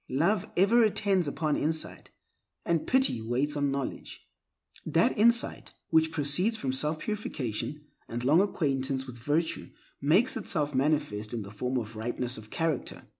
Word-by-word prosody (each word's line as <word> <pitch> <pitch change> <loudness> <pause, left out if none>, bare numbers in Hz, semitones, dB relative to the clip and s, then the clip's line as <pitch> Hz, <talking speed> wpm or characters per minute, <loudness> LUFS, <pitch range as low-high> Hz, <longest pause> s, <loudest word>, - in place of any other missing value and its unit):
Love 170 +9 +1
ever 210 +6 +5
attends 200 -5 +2
upon 150 +1 0
insight, 160 +1 -3 0.6
and 165 -2 0
pity 260 - +2
waits 130 +6 -1
on 145 -1 +1
knowledge. 135 -1 -5 0.6
That - - +2
insight 235 +2 +2 0.2
which 160 0 +4
proceeds 165 +9 +1
from 130 -9 -2
self 150 +4 0
purification 150 - -4 0.2
and 120 +1 -4
long 150 +8 +5
acquaintance 135 -8 -1
with 125 -2 -10
virtue 150 +7 -1 0.3
makes 180 - +3
itself 150 -8 -1
manifest 130 -6 0
in 110 - -3
the 100 - -10
form 125 +5 -2
of 115 -2 -4
ripeness 120 +2 -2
of 110 0 -13
character. 160 -2 -2
145 Hz, 145 wpm, -29 LUFS, 130-170 Hz, 0.6 s, ever